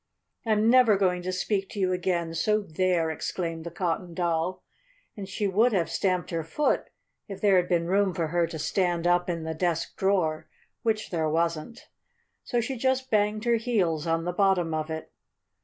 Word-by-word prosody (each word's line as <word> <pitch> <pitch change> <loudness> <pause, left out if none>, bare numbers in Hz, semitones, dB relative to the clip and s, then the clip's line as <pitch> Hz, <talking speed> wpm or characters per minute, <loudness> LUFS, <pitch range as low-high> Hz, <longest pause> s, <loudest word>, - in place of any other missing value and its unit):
"I'm 215 0 +3
never 240 -4 +6
going 180 -2 +1
to 185 +1 -3
speak 195 +1 -1
to 205 - -7
you 185 -1 +1
again, 175 -2 -1
so 210 +6 +1
there!" 175 -2 0
exclaimed 165 +1 -4
the 170 - -5
Cotton 170 0 -3
Doll, 170 +1 -1 0.5
and 200 -2 -7
she 205 +1 -1
would 220 +5 +3
have 175 -4 0
stamped 185 -2 0
her 165 -1 -2
foot 290 - 0 0.4
if 195 -2 -7
there 200 -3 +4
had 180 0 +1
been 170 -2 +2
room 190 0 +1
for 165 -2 -1
her 170 +1 +1
to 165 - -6
stand 175 +1 0
up 175 0 +2
in 165 -2 -2
the 160 0 -3
desk 165 0 -1
drawer 185 -6 0 0.3
which 220 -1 -1
there 160 -3 0
wasn't. 165 +6 -2 0.6
So 240 - -1
she 255 +3 -4
just 260 +1 0
banged 210 +1 +1
her 235 -1 +3
heels 185 -9 0
on 165 0 +1
the 180 +1 -2
bottom 180 -4 +2
of 155 0 -2
it. 160 0 -6
180 Hz, 190 wpm, -27 LUFS, 165-205 Hz, 0.6 s, never